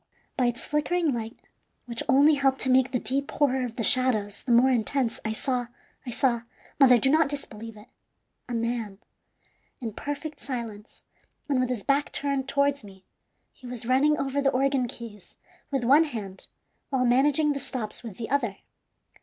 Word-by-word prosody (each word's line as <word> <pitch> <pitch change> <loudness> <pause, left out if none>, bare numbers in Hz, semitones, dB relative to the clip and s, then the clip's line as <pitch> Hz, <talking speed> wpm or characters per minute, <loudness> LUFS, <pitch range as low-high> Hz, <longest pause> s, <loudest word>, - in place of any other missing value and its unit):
By 250 -3 +2
its 240 0 -2
flickering 305 +1 0
light, 225 -1 -5 0.5
which 235 -1 -2
only 285 +3 +6
helped 270 -2 +2
to 260 - +1
make 260 0 +4
the 250 - +1
deep 270 +4 -1
horror 265 -3 +1
of 235 -2 -5
the 235 - -2
shadows 220 -5 +2
the 250 - -3
more 245 +3 +5
intense, 245 +1 0
I 220 - -2
saw 245 +2 -2 0.4
I - - -3
saw 235 0 +1 0.4
mother, 255 -3 +7
do 250 - +1
not 310 -1 +4
disbelieve 225 -6 -7
it 210 +3 -14 0.6
a 240 - -2
man. 230 -3 -2 0.8
In 230 -5 -5
perfect 290 +5 -5
silence, 230 -5 -7 0.4
and 275 -4 +1
with 255 -1 0
his 240 -6 -3
back 280 +4 +1
turned 275 -2 -2
towards 280 -1 +1
me, 190 -2 -14 0.5
he 255 - -13
was 245 -2 -4
running 275 +5 +3
over 275 0 -1
the 275 - +3
organ 270 -1 +1
keys 225 -4 -10 0.3
with 270 -3 -1
one 285 +7 +6
hand 210 -9 -6 0.4
while 260 -2 +1
managing 290 +4 +3
the 280 - -4
stops 235 -5 -4
with 225 -6 -9
the 230 0 -6
other. 235 -9 0
255 Hz, 175 wpm, -26 LUFS, 230-280 Hz, 0.8 s, mother